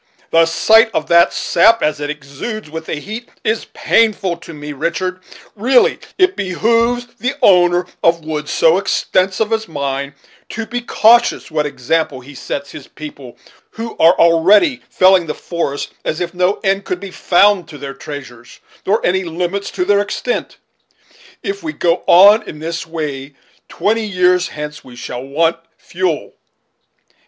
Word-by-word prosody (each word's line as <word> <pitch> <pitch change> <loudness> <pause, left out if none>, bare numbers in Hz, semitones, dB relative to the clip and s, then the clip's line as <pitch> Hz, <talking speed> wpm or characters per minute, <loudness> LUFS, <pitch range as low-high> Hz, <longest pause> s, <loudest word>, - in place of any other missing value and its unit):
The 165 0 +4
sight 220 +7 +4
of 155 - 0
that 170 0 +5
sap, 225 +7 +3
as 150 -1 0
it 145 0 -4
exudes 150 - -7
with 160 0 -7
the - - -2
heat, 215 +10 -8
is 220 +1 -1
painful 210 -5 +1
to 170 - -12
me, 150 -1 -8
Richard, 185 +5 -3 0.4
Really, 245 +5 +3 0.2
it 370 +1 +3
behooves 230 +6 0
the 255 +3 -2
owner 175 -1 +4 0.2
of 165 -1 +2
woods 150 -1 -4
so 165 +3 +3
extensive 195 +2 0
as 220 0 -2
mine, 140 -2 -4 0.3
to 225 0 -5
be 240 +2 -4
cautious 235 -5 +3
what 150 -1 0
example 140 0 -2
he 140 +4 -13
sets 140 +1 -6
his 145 - -11
people, 140 -5 -11 0.4
who 225 0 -6
are 165 +2 +6
already 195 - +4
felling 185 -2 +4
the 150 - -3
forests 155 -5 -4
as 155 - -3
if 175 -1 -3
no 180 +2 0
end 195 0 +1
could 180 -2 -4
be 195 0 -8
found 195 +1 +3
to 150 - -10
their 140 -1 -7
treasures, 135 -4 -10 0.3
nor 210 +4 +1
any 190 +1 +1
limits 180 +4 -3
to 180 - -2
their 205 +1 +3
extent. - - -3 0.9
If 395 0 -4
we 320 -2 -5
go 175 0 0
on 200 +5 +7
in 150 - -9
this 165 +1 -5
way, 145 -4 -5 0.3
twenty 220 +1 -1
years 180 -1 +2
hence 150 0 -7
we 125 -2 -14
shall 125 0 -6
want 160 +5 0 0.2
fuel." 175 -3 -3
175 Hz, 160 wpm, -16 LUFS, 150-205 Hz, 0.9 s, on